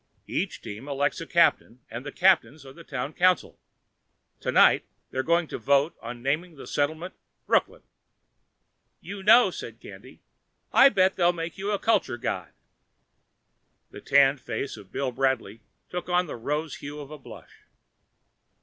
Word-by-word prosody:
Each - - -3
team 110 +7 -8
elects 140 +2 -1
a 165 - -7
captain 165 -7 +2
and 115 +3 -7
the 145 - -7
captains 160 -5 +2
are 135 - -11
the 170 - -13
town 140 0 -5
council. 180 +2 +1 0.8
Tonight - - +4 0.3
they're 130 - -1
going 170 +4 +2
to - - -5
vote 140 +3 +2
on 120 +1 -8
naming 155 +5 -1
the 135 - -11
settlement 155 +5 -2 0.3
Brooklyn." - - +1 1.2
"You 200 0 -8
know," 220 +5 +6
said - - -8
Candy, - - -13 0.5
"I'll 270 - +8
bet 190 -5 +2
they'll 175 -1 +3
make 165 +1 -6
you 195 +1 -3
a 205 - +1
culture 220 - +1
god." - - -4 1.4
The - - -10
tanned 140 -1 +4
face 120 +5 -4
of 100 -3 -14
Bill 135 -2 -2
Bradley 120 -5 -1 0.3
took 180 0 -6
on 180 0 +2
the 155 - -7
rose 150 +6 -3
hue 145 +1 -8
of 145 0 -9
a 155 - -9
blush. - - -14
150 Hz, 155 wpm, -26 LUFS, 135-175 Hz, 1.4 s, I'll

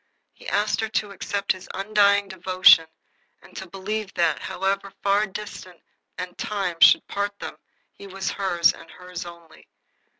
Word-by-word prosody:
He - - -14
asked 210 +2 0
her 220 - -2
to 210 -1 -2
accept 200 +1 -2
his 185 - -6
undying 200 0 +3
devotion, 185 -3 +5 0.6
and - - -18
to 190 - -8
believe 200 +2 -4
that, 170 -2 +1
however 195 +1 -2
far 200 +2 +2
distance 190 -3 -9 0.3
and 180 -1 -6
time 195 -5 -2
should - - +7
part 200 0 -3
them, - - -8 0.4
he 200 - -12
was 195 0 -4
hers 175 -4 +2
and - - -14
hers 180 -1 -8
only. 170 -2 -14
195 Hz, 155 wpm, -24 LUFS, 180-200 Hz, 0.6 s, should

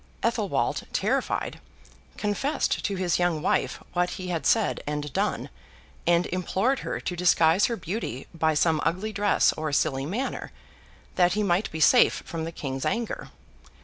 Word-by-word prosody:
Athelwold, - - 0
terrified, - - -1 0.6
confessed 210 +8 -1
to 200 - -1
his 185 -2 0
young 175 -3 +1
wife - - +1 0.2
what 180 0 +1
he 185 -1 -5
had 170 -3 -1
said 220 -2 +2
and 150 -1 -3
done, - - -1 0.6
and 175 +1 +4
implored 190 +8 0
her - - -4
to 180 - -4
disguise 170 +1 +4
her 235 - -2
beauty 170 - -4
by 160 -1 +1
some 160 0 +2
ugly 205 +6 -1
dress 205 0 +3
or 155 -1 -3
silly 140 -1 0
manner, 235 - -3 0.7
that 175 -1 +4
he 210 - 0
might 190 +1 +1
be 160 - -6
safe 245 +10 +5
from 165 -2 -4
the 165 - -4
King's 135 -4 -4
anger. 235 -1 -2
175 Hz, 155 wpm, -26 LUFS, 160-205 Hz, 0.7 s, safe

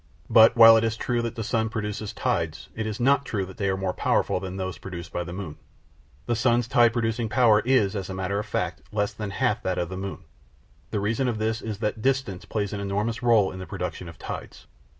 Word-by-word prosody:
But 110 0 +7
while 115 -1 +10
it 110 - +2
is 115 0 -1
true 120 0 -1
that 115 -1 -4
the 115 - -3
sun 110 +1 0
produces 105 -1 -4
tides, 80 -2 -2
it 110 0 -3
is 110 +1 -4
not 140 +3 +3
true 105 -7 -2
that 95 - -12
they 100 -3 0
are 95 - 0
more 95 -1 -2
powerful - - +1
than 95 0 -6
those 95 -3 -4
produced 85 -3 -8
by 90 - -1
the 85 - -8
moon. 90 -4 -6 0.7
The 120 - 0
sun's 120 0 +2
tide 120 -1 +5
producing 115 0 -1
power 110 -1 +5
is, 110 -4 +2
as 95 -2 -4
a 95 - -4
matter 95 +2 -1
of 105 - -5
fact, 90 -3 -2
less 105 -1 -1
than 105 -2 -5
half 100 - 0
that 95 -1 -2
of 85 - -1
the 95 - -6
moon. 95 -1 -6 0.7
The 105 - -2
reason 110 +6 0
of 120 -3 -1
this 110 +1 -1
is 110 -3 -4
that 105 0 -2
distance 130 -8 -1
plays 105 -2 -2
an 105 - -3
enormous 105 +4 -2
rôle 115 -6 +3
in 95 - -8
the 95 - -7
production 90 - -5
of 85 - -12
tides. - - -8
105 Hz, 235 wpm, -25 LUFS, 95-115 Hz, 0.7 s, while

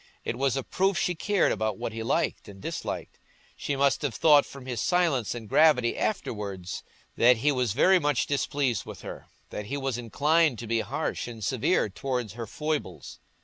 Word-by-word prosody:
It - - -2
was 135 +1 +1
a 135 - -2
proof 190 +5 0
she 180 - +1
cared 200 +3 +1
about 110 -3 -1
what 110 - -4
he 115 - -5
liked 115 - -1
and 100 -1 -11
disliked. - - -5 0.4
She 145 - -3
must 140 0 +2
have 140 -7 -2
thought 150 +1 +5
from 140 -2 -11
his 125 -3 -3
silence 165 - +1
and 115 -2 -7
gravity 135 -2 +4
afterwards 100 - -3 0.4
that 125 +1 +6
he 145 +6 +2
was 125 -6 0
very 185 +9 +5
much 145 -5 +1
displeased 140 -5 0
with - - -10
her, - - -8 0.2
that 105 - -5
he 140 - -3
was 135 -3 -2
inclined 145 +5 +2
to 115 - -6
be 115 +1 0
harsh 140 +5 -3
and 115 -3 -8
severe 115 0 +1
towards 125 0 -3
her 115 -1 -6
foibles. 145 - -4
130 Hz, 190 wpm, -27 LUFS, 110-150 Hz, 0.4 s, that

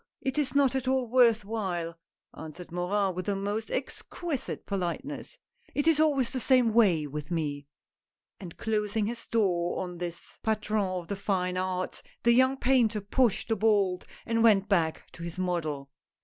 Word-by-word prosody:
it 265 +2 -1
is 285 -1 0
not 275 -3 +4
at 265 -1 -2
all 260 -1 +2
worth 230 -3 +4
while," 180 -6 -3 0.4
answered 160 +2 -9
Morin 190 +2 0
with 180 0 -5
the 200 - +1
most 205 +3 -3
exquisite 285 +2 -4
politeness, 200 - -4 0.2
" 475 -1 -32
it 290 - +1
is 325 -2 +4
always 285 -6 +3
the 260 - -2
same 250 -3 +3
way 190 -10 +4
with 150 +2 -6
me." 145 -4 -2 0.7
And 175 -4 -9
closing 210 -1 0
his 230 +2 -5
door 180 -6 +1
on 180 -1 -7
this 175 -1 -7
patron 215 -1 0
of 180 -2 -4
the 200 - -2
fine 185 -2 -1
arts, 185 0 -2 0.2
the 235 - +5
young 260 +2 +4
painter 245 -5 +3
pushed 230 +3 +1
the 225 - +2
bolt 200 -4 +2 0.2
and 230 -1 +1
went 205 -3 +5
back 170 -6 +1
to - - -12
his 170 0 -6
model. 155 -7 -2
205 Hz, 170 wpm, -28 LUFS, 180-240 Hz, 0.7 s, the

